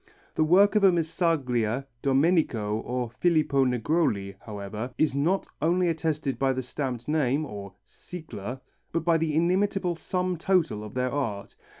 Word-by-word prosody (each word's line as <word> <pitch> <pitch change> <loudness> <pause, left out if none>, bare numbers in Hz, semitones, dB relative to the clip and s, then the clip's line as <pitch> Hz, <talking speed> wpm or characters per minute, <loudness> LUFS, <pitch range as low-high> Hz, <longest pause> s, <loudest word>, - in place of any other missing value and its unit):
The 155 - +2
work 190 +6 +5
of 210 - +3
a 195 - +7
Missaglia, 145 - 0 0.2
Domenico 135 - +2
or 125 0 -3
Filippo 155 -5 +3
Negroli, 125 - 0
however, 105 +3 -6
is 155 -4 +2
not 165 +8 +1 0.2
only 175 +3 +2
attested 155 -4 -1
by 135 -1 +2
the 130 0 -3
stamped 125 -2 -4
name 150 -1 +1
or 100 -6 -8
sigla 130 - -8 0.3
but 165 -1 -2
by 165 -1 +4
the 155 -2 0
inimitable 180 +2 +1
sum 180 +1 -2
total 165 - +1
of 105 +1 -9
their 125 0 0
art. 115 -8 -3
145 Hz, 145 wpm, -27 LUFS, 120-170 Hz, 0.3 s, a